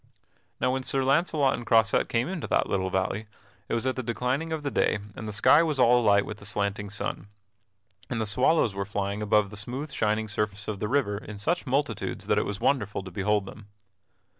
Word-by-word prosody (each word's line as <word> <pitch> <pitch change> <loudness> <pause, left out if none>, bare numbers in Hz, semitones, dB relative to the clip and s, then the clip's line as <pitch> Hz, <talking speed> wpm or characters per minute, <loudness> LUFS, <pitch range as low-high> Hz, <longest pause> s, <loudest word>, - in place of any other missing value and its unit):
Now 125 +1 +2
when 130 +1 -1
Sir 135 +1 0
Launcelot 140 0 +2
and - - -4
Croisette 115 -1 +3
came 115 +3 0
into 175 -3 -4
that - - +2
little 95 -1 -1
valley 95 +3 -1 0.4
it - - 0
was 115 - -1
at 130 - 0
the 130 - -2
declining 125 +6 -2
of 160 -2 -3
the 140 - -2
day - - +2 0.2
and 110 - -6
the - - -3
sky 110 +9 +5
was 155 -4 0
all 125 0 +5
alight 100 -2 +4
with 105 0 -7
the 100 - -11
slanting 100 -1 -2
sun, 105 -2 -4 0.8
and 120 - -2
the 110 - 0
swallows 125 +2 +2
were 100 0 -2
flying 100 +1 -3
above 105 -1 +2
the 105 - -9
smooth 130 +8 -5
shining 110 0 0
surface 105 0 -3
of 105 -2 -3
the 105 - -2
river 110 -5 0
in 105 -1 -9
such 160 - -1
multitudes 130 -4 -1
that - - +2
it - - -1
was 100 -1 -4
wonderful 105 -8 0
to 95 - -9
behold 100 +2 0
them. 105 +1 -11
110 Hz, 215 wpm, -27 LUFS, 105-130 Hz, 0.8 s, sky